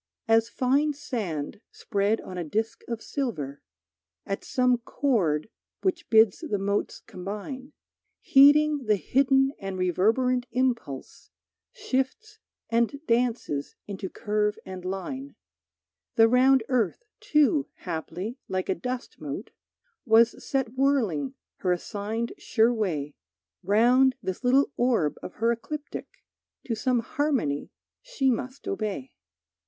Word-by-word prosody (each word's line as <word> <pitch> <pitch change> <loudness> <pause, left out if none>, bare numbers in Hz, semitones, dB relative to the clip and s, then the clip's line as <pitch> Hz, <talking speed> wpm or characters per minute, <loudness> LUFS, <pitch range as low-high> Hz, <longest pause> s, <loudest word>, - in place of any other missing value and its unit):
As 225 0 +4
fine 280 +5 +2
sand 210 - -4
spread 205 +1 0
on 185 - -8
a 175 - -2
disc 220 +8 -2
of 235 -2 -4
silver, 155 - -3 0.6
At 195 - -3
some 250 -1 +2
chord 215 - 0 0.4
which 355 -2 -1
bids 220 -3 +5
the 305 -11 -2
motes 200 +1 -1
combine, 210 +9 -7 0.5
Heeding 290 0 +5
the 215 -1 +4
hidden 270 +5 +3
and 195 -1 -5
reverberant 225 +8 +2
impulse, 240 - -2 0.4
Shifts 425 - -3 0.3
and 235 +4 +1
dances 230 - 0
into 195 -1 -5
curve 210 0 -1
and 185 -1 -7
line, 260 +10 -5 0.8
The 225 0 +7
round 255 +1 +5
earth, 245 - 0 0.2
too, 300 -1 +3
haply, 180 - -5
like 185 -1 -2
a - - +4
dust 250 +8 -5
mote, - - -6 0.5
Was 230 0 +4
set 265 -4 -1
whirling 245 - +1 0.2
her 180 - 0
assigned 210 +5 -3
sure 230 +2 +3
way, 160 -10 -2 0.5
Round 245 +7 +4
this 185 +6 -4
little 265 +3 +4
orb 235 - +1
of - - -7
her 230 +2 +1
ecliptic 295 +6 -5 0.6
To 235 - -2
some 240 +2 +1
harmony 250 - -1 0.3
she 310 - +1
must 255 +7 -4
obey. 255 - -3
230 Hz, 120 wpm, -27 LUFS, 195-265 Hz, 0.8 s, The